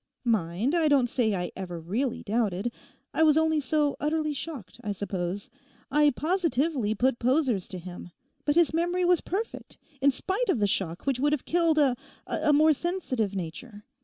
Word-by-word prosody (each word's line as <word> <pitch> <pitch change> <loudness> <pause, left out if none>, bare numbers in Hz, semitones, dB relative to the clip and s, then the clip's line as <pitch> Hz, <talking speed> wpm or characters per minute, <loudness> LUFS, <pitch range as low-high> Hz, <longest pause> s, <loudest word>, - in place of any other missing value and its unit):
Mind, 215 - 0
I 335 -3 +3
don't 280 -4 +4
say 235 -4 +1
I 180 -1 -3
ever 175 -3 -5
really 225 +10 -2
doubted. 215 0 -1 0.4
I - - +1
was 310 -1 +5
only 315 -1 +3
so 295 +1 +1
utterly 305 0 0
shocked, 270 - -6
I 205 -2 -2
suppose. 200 +3 -4 0.4
I 295 +1 +5
positively 300 - 0
put 250 +3 +1
posers 250 - +1
to 185 - -6
him; 175 0 -9 0.3
but 290 - +1
his 340 -2 +4
memory 350 +2 +1
was 355 -1 +4
perfect 420 +6 -5 0.2
in 280 - +5
spite 385 - -1
of 370 - +3
the 210 - +2
shock 180 -4 -1
which 270 -3 0
would 295 +2 +2
have 295 - -2
killed 335 -2 +2
a—a 275 +2 0
more 305 +2 +5
sensitive 265 - -2
nature. 205 +5 -7
265 Hz, 170 wpm, -27 LUFS, 205-310 Hz, 0.4 s, was